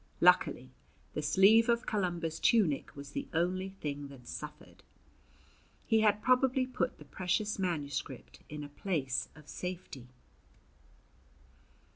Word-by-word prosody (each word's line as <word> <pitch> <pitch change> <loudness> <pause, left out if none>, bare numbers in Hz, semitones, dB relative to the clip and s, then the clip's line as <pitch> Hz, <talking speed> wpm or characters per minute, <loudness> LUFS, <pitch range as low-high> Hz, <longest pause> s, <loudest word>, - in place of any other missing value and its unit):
Luckily - - +4 0.4
the - - -2
sleeve 195 +10 +5
of 235 +1 +2
Columba's 175 -5 -1
tunic 185 -12 +2
was 140 0 -9
the - - -4
only 185 +3 0
thing 145 -1 -4
that 130 -3 -13
suffered. 150 +2 -8 1.0
He 225 -1 +3
had 210 -1 +3
probably 255 0 +3
put 255 -1 -2
the - - -13
precious 195 +3 -1
manuscript 145 -7 -3
in 150 0 -6
a - - -6
place 145 -5 -2
of 150 -1 -15
safety. 180 -9 -6
175 Hz, 120 wpm, -32 LUFS, 145-210 Hz, 1.0 s, sleeve